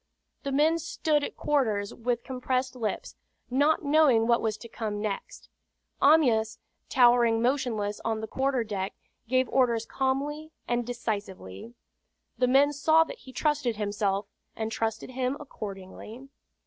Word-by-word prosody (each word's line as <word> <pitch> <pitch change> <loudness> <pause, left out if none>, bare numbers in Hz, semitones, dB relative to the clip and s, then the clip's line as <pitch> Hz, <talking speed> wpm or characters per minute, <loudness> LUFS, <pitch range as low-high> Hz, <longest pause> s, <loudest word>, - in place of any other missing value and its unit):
The 275 - -3
men 310 +4 +3
stood 310 -2 0
at - - -5
quarters 220 -9 0
with 235 0 -2
compressed 255 0 -2
lips, 225 -4 -4 0.4
not 290 +6 +3
knowing 285 -6 +4
what 235 0 +3
was 215 -1 -1
to 235 - -10
come 215 -3 -4
next. 205 -2 -5 0.5
Amyas, 235 -7 +4 0.3
towering 240 -2 +5
motionless 230 -5 0
on 225 -1 -1
the 220 - -4
quarter 265 +1 0
deck, 200 -3 -4 0.3
gave 255 +1 +2
orders 235 -4 +2
calmly 280 +5 -2 0.2
and 240 -1 -1
decisively. 210 - -5 0.6
The 250 - +3
men 280 +3 +4
saw 315 +3 +4
that 465 +9 -9
he 260 - -13
trusted 285 -2 0
himself, 205 -1 -1 0.3
and 220 0 -3
trusted 225 +2 -2
him 255 +1 -1
accordingly. 215 +1 -9
245 Hz, 135 wpm, -28 LUFS, 220-275 Hz, 0.6 s, towering